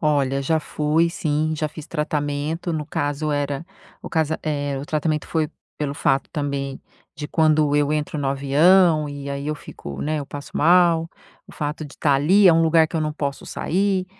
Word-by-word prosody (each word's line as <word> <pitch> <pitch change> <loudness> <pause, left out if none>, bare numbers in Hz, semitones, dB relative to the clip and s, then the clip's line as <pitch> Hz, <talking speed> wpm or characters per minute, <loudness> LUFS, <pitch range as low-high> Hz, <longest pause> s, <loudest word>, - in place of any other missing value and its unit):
Olha, 140 -3 +1
já 160 +3 +1
fui 155 +3 +1
sim, 155 -3 -1
já 155 0 -1
fiz 155 0 -10
tratamento 150 +2 -2
no 155 -2 -3
caso 145 +2 -2
era 145 +2 -2 0.4
o - - -6
cas 160 -2 0
é 145 -3 -2
o 140 - -5
tratamento 155 0 -1
foi 160 -2 -1 0.3
pelo 145 -2 -3
fato 135 -1 +1
também 140 -3 -3 0.4
de 150 - -5
quando 155 -2 +2
eu 145 0 +2
entro 150 0 -2
no 140 -2 -1
avião 155 +4 +4
e 140 0 -7
aí 140 +1 -4
eu 155 - -1
fico, 70 - -9
né, 155 +1 -1
eu 140 - -7
passo 145 +1 -8
mal. 170 0 +4 0.4
O - - -12
fato 150 +1 -4
de 145 - -11
estar 145 -2 +2
ali 185 +9 +5
é 175 - +8
um 165 - +4
lugar 160 0 +4
que 155 - -16
eu - - 0
não 155 0 -1
posso 140 -2 -4
sair, 190 +1 0
150 Hz, 195 wpm, -22 LUFS, 145-160 Hz, 0.4 s, é